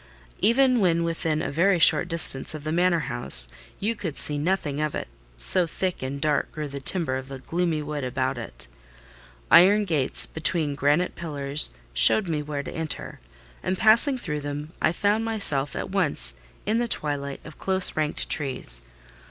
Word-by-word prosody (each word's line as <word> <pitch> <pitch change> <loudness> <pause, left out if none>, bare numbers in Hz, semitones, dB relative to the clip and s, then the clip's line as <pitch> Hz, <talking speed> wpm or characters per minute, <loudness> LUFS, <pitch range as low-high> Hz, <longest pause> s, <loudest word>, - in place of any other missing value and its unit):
Even 255 +2 +3
when 170 -4 +2
within 165 -2 -1
a - - -3
very 180 +6 +2
short 175 +1 +5
distance 160 -4 +1
of 150 - -8
the 155 - -3
manor 175 0 +2
house, - - +2 0.3
you 215 +4 -1
could 170 -8 -6
see 145 -1 0
nothing 150 -3 -1
of 155 -1 -2
it, - - -4 0.3
so 170 - +3
thick 185 +3 -3
and 135 +2 -4
dark 150 -1 0
grew 155 -1 -5
the 140 0 -7
timber 140 -4 -1
of 130 0 -8
the 135 -1 -8
gloomy 165 +2 -2
wood 145 -1 -5
about 130 +1 -2
it. 115 - -9 0.9
Iron 205 +4 +6
gates 150 -8 -1
between 160 -2 -1
granite 145 +5 +1
pillars 145 -3 -4 0.2
showed 175 - +6
me 155 -3 -2
where 145 -1 -5
to - - -8
enter, 160 -1 -5 0.4
and 185 - -2
passing 230 +7 +4
through 150 -10 -4
them, 145 +2 -6
I - - +3
found 205 +5 0
myself 155 -12 0
at - - -5
once 145 - -1 0.3
in 220 +3 +1
the 240 - -1
twilight 145 -8 -3
of 155 - -12
close 190 -1 +4
ranked 155 -1 -2
trees. 130 - +3
155 Hz, 175 wpm, -24 LUFS, 140-185 Hz, 0.9 s, Iron